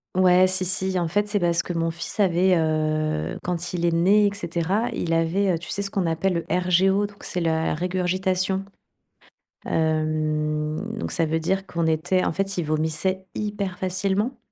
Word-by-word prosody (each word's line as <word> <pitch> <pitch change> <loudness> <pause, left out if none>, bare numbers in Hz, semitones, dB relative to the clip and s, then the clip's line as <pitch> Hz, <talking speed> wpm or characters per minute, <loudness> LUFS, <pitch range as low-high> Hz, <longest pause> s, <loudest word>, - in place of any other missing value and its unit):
Ouais, 185 0 +5
si, 185 0 +1
si, 185 +1 +1
en 175 -2 0
fait, 205 +5 0
c'est 205 -1 0
parce 170 -1 +2
que 175 - -5
mon 165 0 0
fils 170 +6 -6
avait, 185 -1 +3
heu, 155 - 0
quand 175 -1 -3
il 175 -1 -1
est 170 - +3
né, 190 +5 +4
et 200 - -2
cetera, 185 +4 -1
il 165 - -2
avait, 170 +4 +2
heu, 165 - -1
tu 175 - -9
sais, 200 - -2
ce 195 - -4
qu'on 190 -4 0
appelle 165 +3 0
le 170 - -2
RGO 185 +3 +2
donc 205 0 -11
c'est 180 - -3
la 160 -1 0
régurgitation. 185 +2 -1 1.0
Hem, 155 -1 0 0.2
donc - - -4
ça 165 - +1
veut 160 +1 0
dire 190 +4 -1
qu'on 170 -2 -2
était 175 +4 +1
en - - 0
fait, 195 +2 -2
il - - +1
vomissait 160 +5 -1
hyper 205 -3 -3
facilement. 195 +6 -1
180 Hz, 185 wpm, -24 LUFS, 160-190 Hz, 1.0 s, Ouais